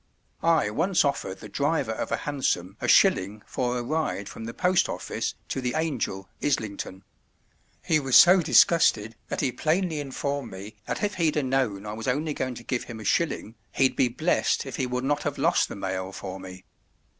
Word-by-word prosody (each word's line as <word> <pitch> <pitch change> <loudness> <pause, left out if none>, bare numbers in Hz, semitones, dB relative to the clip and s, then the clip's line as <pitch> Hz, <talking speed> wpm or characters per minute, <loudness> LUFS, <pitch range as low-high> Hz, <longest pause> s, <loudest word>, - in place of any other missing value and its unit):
I 165 -10 +3
once 170 - +2
offered 95 -9 -2
the - - -8
driver - - 0
of - - -4
a - - +1
Hansom 100 -11 -2
a - - -1
shilling 100 +3 +4
for 125 0 -2
a 120 - -3
ride 150 -7 -2
from 115 - -8
the 115 - -5
Post 180 0 +2
Office - - -3
to 135 - -2
the 125 +1 -2
Angel, 130 - -2 0.2
Islington; 100 -7 -2 0.8
he 155 - +3
was 135 -4 0
so 180 +7 +8
disgusted 115 -9 +4
that - - -3
he 130 - +1
plainly 160 +5 0
informed 140 -1 -3
me 100 +3 -9
that - - -3
if 205 0 0
he'd 155 -2 +2
a 150 - +1
known 125 -7 0
I 105 - -5
was 110 +1 -6
only 150 +4 0
going 130 -3 -3
to 120 - -9
give 120 0 -2
him 115 -2 -8
a - - -8
shilling, 150 -5 0 0.2
he'd 135 -1 +2
be 130 - +3
blessed 155 +7 0
if 135 - -6
he 130 - -1
would 125 +1 -2
not 145 +2 0
have - - -3
lost - - +2
the - - -6
mail 95 -1 -3
for 95 -1 -7
me. 95 0 -10
130 Hz, 200 wpm, -26 LUFS, 105-150 Hz, 0.8 s, so